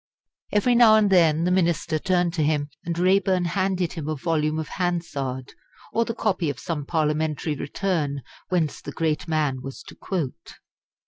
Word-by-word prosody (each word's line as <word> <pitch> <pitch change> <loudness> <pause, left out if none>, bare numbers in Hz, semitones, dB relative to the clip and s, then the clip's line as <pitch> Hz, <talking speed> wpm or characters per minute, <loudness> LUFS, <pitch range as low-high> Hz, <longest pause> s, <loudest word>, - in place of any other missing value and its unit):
Every 210 +4 +3
now 235 -2 +7
and 210 -2 +3
then 165 -3 +4
the 180 - +1
Minister 170 -3 +1
turned 175 -1 +1
to 170 - -1
him, 150 -1 0
and 170 0 -3
Raeburn 185 0 +3
handed 185 -1 0
him 155 -2 -5
a 155 - -1
volume 155 +1 0
of 160 - -3
Hansard 140 -8 -3 0.4
or 230 +1 +2
the 230 - -4
copy 185 -8 0
of 140 - -4
some 150 -4 -4
Parliamentary 155 -1 0
Return 145 -2 -2 0.3
whence 170 -5 0
the 145 - -7
great 160 +1 -1
man 150 -5 0
was 135 0 -8
to - - -12
quote. 150 - -5
165 Hz, 170 wpm, -24 LUFS, 150-185 Hz, 0.4 s, now